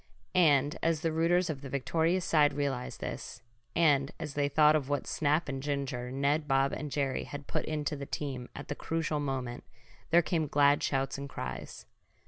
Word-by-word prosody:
And 145 -5 +4
as 165 -2 +1
the 165 - 0
rooters 170 +3 +2
of 145 -4 -4
the 140 - -7
victorious 165 +7 +1
side 150 -5 +4
realized 140 -3 -3
this, 120 - -6 0.3
and 145 -5 +4
as 155 -3 -5
they 145 0 +1
thought 150 +1 +5
of 145 -3 -1
what 145 -2 0
snap 155 +2 +1
and 135 -1 -3
ginger 135 -3 -3
Ned, 140 +3 +1
Bob 135 -1 +2
and 150 - -4
Jerry 135 -2 -1
had 145 0 -7
put - - -2
into 150 -1 -2
the 140 -1 -6
team 130 -4 -4
at 145 - -7
the - - -2
crucial 160 -2 -2
moment, 130 -4 -3 0.5
there 170 +1 +5
came 160 -3 0
glad 145 0 +4
shouts 135 0 -1
and 140 0 -6
cries. - - -6
145 Hz, 185 wpm, -31 LUFS, 135-155 Hz, 0.5 s, thought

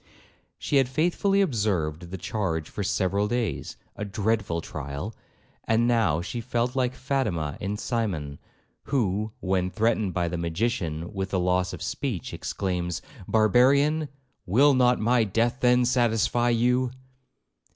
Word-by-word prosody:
She 145 - 0
had 135 -2 +3
faithfully 175 +7 +2
observed 90 - -1
the 95 - -5
charge 90 -5 -2
for - - -6
several 100 +2 +1
days,—a 115 -2 -4
dreadful 100 -4 -1
trial!—and 85 - -4
now 110 -10 +2
she 120 +5 -4
felt 120 +1 -1
like 130 -1 0
Fatima 90 - -1
in 100 +1 -2
Cymon, 90 - -2 0.5
who, 110 -5 0
when 90 0 0
threatened 110 -2 0
by 90 -1 +1
the 85 +1 -3
magician 85 -1 -2
with 95 -1 -3
the 95 - 0
loss 90 +1 +1
of - - -7
speech, 120 - -3
exclaims, 90 -3 -3 0.2
'Barbarian, 140 +8 +3 0.4
will 135 +10 +5
not 125 -1 +3
my 115 +2 +3
death 115 +4 0
then 125 0 +4
satisfy 120 -1 +2
you?' 125 +2 +2
110 Hz, 130 wpm, -26 LUFS, 90-125 Hz, 0.5 s, will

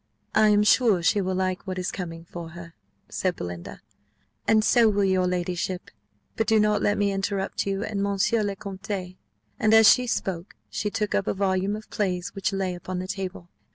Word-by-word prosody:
"I 215 0 +5
am 210 0 +4
sure 210 -3 +4
she 200 +4 +3
will 185 0 -1
like 185 +1 -2
what 185 0 -3
is 180 0 -2
coming 165 -3 -6
for 170 -1 -8
her," 170 -1 -10 0.3
said 185 -2 -1
Belinda, 85 -1 -7 0.7
"and 215 -1 +4
so 230 0 +5
will 205 -1 +1
your 190 -1 +2
ladyship; 180 0 -3 0.4
but 225 - 0
do 220 -1 +4
not 210 -1 +2
let 205 - +2
me 205 -1 +2
interrupt 195 0 -2
you 195 +1 -1
and 210 -3 -3
monsieur 200 +3 +1
le 200 -1 -1
Comte." 195 -2 -6 0.4
And 215 +1 +4
as 220 -1 +8
she 250 0 -2
spoke, 185 -4 -3 0.2
she 210 - -2
took 210 0 -2
up 200 - 0
a - - 0
volume 195 +1 0
of 215 0 -9
plays 180 -3 -2
which 195 +1 -1
lay 190 -2 -1
upon 180 +1 -6
the 185 +1 -4
table. 185 -2 -5
195 Hz, 195 wpm, -25 LUFS, 180-210 Hz, 0.7 s, as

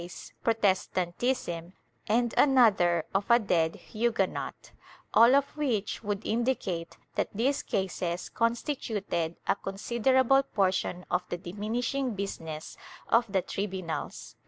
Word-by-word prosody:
VIII] 170 - -7
BURNING 175 - -11
OF - - -10
EFFIGIES 215 -4 0
91 175 -2 0
Protestantism, 175 -9 -2 0.3
and 235 +2 +2
another 200 - +4
of 195 +1 0
a 235 - +8
dead 170 -7 +1
Huguenot 220 -4 -2 0.2
— - - -27
all 235 +3 +7
of 280 0 +1
which 240 -9 -1
would 205 0 -3
indicate 215 -8 -1 0.2
that - - -1
these 260 +6 +1
cases 180 -2 -2
constituted 225 - -1
a - - +3
considerable 240 +7 +2
portion 185 -6 0
of 180 - +2
the 175 - -2
diminishing 225 +7 -2
business 165 -6 -5 0.3
of 230 -2 +3
the 190 -2 +1
tribunals. 190 -4 -4
205 Hz, 135 wpm, -29 LUFS, 180-240 Hz, 0.3 s, a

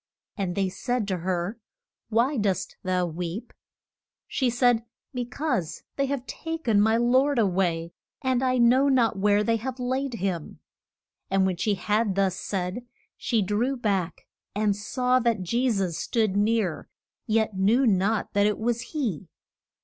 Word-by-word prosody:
And 190 -4 -2
they 195 -1 +1
said 245 +3 -2
to 185 - 0
her, 180 +5 -2 0.5
Why 235 +6 +2
dost 200 -6 -1
thou 185 -1 0
weep? 175 +5 -5 0.7
She 260 -3 0
said, 240 -1 +3 0.3
Be 250 -1 -2
cause 245 - -2
they 275 0 0
have 270 -2 -3
ta 325 +3 -5
ken 225 -10 +2
my 220 +2 +4
Lord 260 +4 +3
a 225 - +4
way, 175 -3 0 0.3
and 260 -2 +1
I 255 -1 +2
know 250 +4 +5
not 230 -6 +2
where 205 +1 +3
they 230 +1 +2
have 255 +3 -5
laid 260 +1 -1
him. 180 -6 -3 0.7
And 195 0 +3
when 185 -2 0
she 205 +3 +1
had 210 +1 0
thus 195 -2 +1
said, 190 +4 -3 0.3
she 225 -3 0
drew 230 +8 0
back 195 -7 -1 0.3
and 210 -1 +2
saw 250 +5 +1
that 230 -5 +1
Je 240 +8 +1
sus 190 -7 -1
stood 215 -1 0
near, 205 -4 0 0.4
yet 220 -2 +1
knew 215 +8 +3
not 205 0 +1
that 205 0 +4
it 210 - 0
was 235 +1 -1
he. 220 - -3
215 Hz, 160 wpm, -26 LUFS, 190-245 Hz, 0.7 s, know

